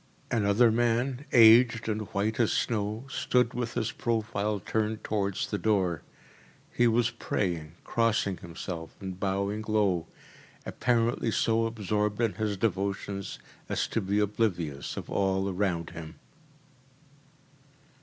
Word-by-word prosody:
Another 110 +1 +4
man, 120 +4 0
aged 115 0 +6
and 110 -1 -2
white 105 +4 -1
as 115 - +3
snow, 110 +1 -1
stood 125 -2 +1
with 120 -1 -3
his 110 - -1
profile 110 -3 -1
turned 110 +3 -2
towards 100 -3 -1
the 105 - -1
door. 95 -7 +1 0.7
He 120 - +4
was 115 0 +2
praying, 85 -5 -2
crossing 115 -5 +1
himself, 85 -1 -7
and 95 -1 -6
bowing 100 +2 -1
low, 100 -6 +1 0.6
apparently 120 -1 +1
so 115 +1 +2
absorbed 105 -1 -1
in 115 -3 +1
his 105 -2 -2
devotions 100 -1 -2 0.3
as - - 0
to 115 - 0
be 100 +1 -1
oblivious 95 -9 -1
of - - -5
all 95 0 0
around 90 -3 -1
him. 80 0 -8
105 Hz, 125 wpm, -28 LUFS, 95-115 Hz, 0.7 s, aged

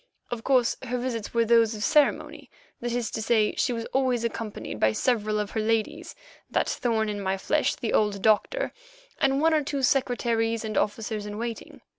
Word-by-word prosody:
Of 235 -2 -4
course, 255 -3 +2
her 250 -1 -3
visits 240 -4 -3
were 230 0 +2
those 230 -1 +4
of 210 - -5
ceremony—that 275 -3 0
is 240 -1 -2
to 220 - -3
say, 220 -1 +2
she 255 - +1
was 230 -1 -3
always 255 -3 +1
accompanied 220 - -4
by 110 0 +3
several 215 - 0
of 210 -1 -3
her 220 - -2
ladies, 225 +10 -1 0.3
that - - +1
thorn 225 -3 0
in 205 -1 -3
my 190 0 -1
flesh, 300 +10 +1
the 235 - -3
old 210 -2 +2
doctor, 220 - +2 0.5
and 275 -3 +2
one 320 +2 +3
or 305 -1 +2
two 280 -1 -3
secretaries 235 -3 +1
and 215 -1 -4
officers 210 0 -1
in 205 0 -6
waiting. 230 0 -6
230 Hz, 185 wpm, -26 LUFS, 215-255 Hz, 0.5 s, those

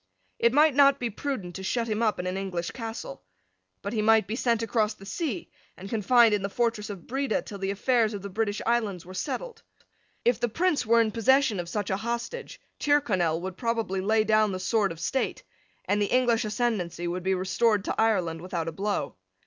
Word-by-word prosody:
It 235 - +4
might 300 +3 +5
not 280 0 +5
be 240 -2 -2
prudent 205 -7 -4
to 190 - -7
shut 230 +4 -1
him 215 0 -1
up 220 -2 +2
in 180 - -3
an 185 +1 -2
English 185 -3 -3
castle. 230 - -6 0.6
But - - -3
he 220 - 0
might 220 0 +4
be 215 - -3
sent 235 -2 +1
across 220 -1 0
the 195 - -14
sea 245 - -4 0.3
and 195 +2 -9
confined 225 +1 +4
in 205 - +1
the 200 - -2
fortress 225 0 -1
of 195 -5 -8
Breda 270 -2 -1
till 200 - -8
the 195 0 -2
affairs 220 +2 +1
of 200 - -7
the - - -4
British 205 +1 -2
Islands 215 -7 0
were 185 - -10
settled. 460 - -4 0.6
If 240 -1 +3
the 240 - 0
Prince 325 -1 0
were 230 +1 +5
in 220 -1 +1
possession 240 -1 +3
of 175 -1 -4
such 205 0 -2
a 190 - +1
hostage, 235 - -4 0.2
Tyrconnel 190 - +2
would 185 0 -6
probably 225 -5 -1
lay 215 +3 +3
down 215 -1 +3
the 185 - -3
sword 205 0 +1
of 165 - -8
state; 260 +10 -2 0.4
and 205 +1 +1
the 205 - +2
English 245 -1 +2
ascendency 210 -6 -1
would 180 +1 -3
be 190 +1 +1
restored 200 +3 +1
to - - 0
Ireland 180 -7 +1
without 175 -2 -3
a - - -2
blow. 200 +5 -2
215 Hz, 210 wpm, -27 LUFS, 190-235 Hz, 0.6 s, might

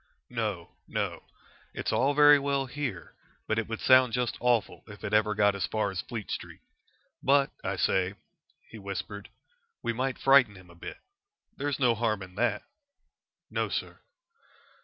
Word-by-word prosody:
"No, 105 -8 -3 0.2
no. - - -2 0.5
It's - - -2
all 140 +3 +2
very 145 0 +8
well 140 -1 0
here, 130 - -5 0.3
but 110 - 0
it 115 - -3
would 115 -1 -4
sound 130 -2 +6
just 125 -2 0
awful 120 -2 +1
if 100 -2 -12
ever 105 +1 +2
it - - -10
got 105 0 +4
as 100 - -2
far 110 -2 -1
as 95 -1 -3
Fleet 115 -4 -6
Street. - - -6 0.6
But, 140 0 +3
I - - -1
say," 95 +1 +1 0.5
he 110 - -11
whispered, 100 +1 -6 0.5
"we 115 - 0
might 130 +2 -2
frighten 135 -6 +5
him 95 -2 -15
a - - -16
bit. 85 - -8 0.6
There's 140 -1 -2
no 125 -4 +3
harm 110 -3 -1
in 90 -1 -12
that." 105 0 0 0.9
"No, - - -1
sir." - - -4
115 Hz, 160 wpm, -29 LUFS, 100-130 Hz, 0.9 s, very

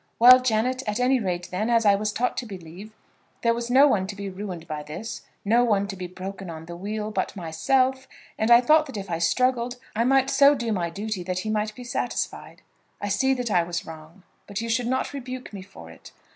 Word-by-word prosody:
Well, 250 +2 +9
Janet; 255 +2 0
at 210 +2 -1
any 255 +1 +3
rate, 180 -4 -3
then, 210 +5 -1
as 230 -1 +3
I 205 - +6
was 210 +1 0
taught 250 +4 -1
to 245 - -3
believe, 185 +1 -10 0.5
there 230 -1 +4
was 235 0 -4
no 270 +4 +6
one 195 -8 +1
to 200 - -6
be 200 -1 -6
ruined 185 -4 -7
by 155 -1 -4
this, 175 +10 -7 0.2
no 230 +4 +4
one 205 -4 +1
to 195 - -5
be 180 -1 -6
broken 190 +1 -7
on 160 -1 -8
the 170 +1 -8
wheel, 210 +4 -4
but 190 0 -2
myself: 255 +10 0 0.3
and 220 - -1
I 235 0 +8
thought 305 +4 +4
that 265 -5 -7
if 195 -2 -6
I 165 - -1
struggled, 250 +7 +1 0.2
I 230 - +2
might 270 +2 +3
so 280 +1 +6
do 235 -4 -3
my 175 -5 -1
duty 205 +2 -4
that 185 0 -2
he 215 - -1
might 215 0 -1
be 250 - -9
satisfied. 245 0 -4 0.4
I 205 - -3
see 265 +7 +2
that 245 -3 -3
I 175 - +4
was 170 0 -4
wrong, 160 +3 -12 0.2
but 200 -1 -4
you 230 0 -4
should 235 +1 0
not 260 +3 -1
rebuke 255 -3 -7
me 195 - -7
for 85 - -13
it. - - -14
215 Hz, 230 wpm, -25 LUFS, 185-245 Hz, 0.5 s, Well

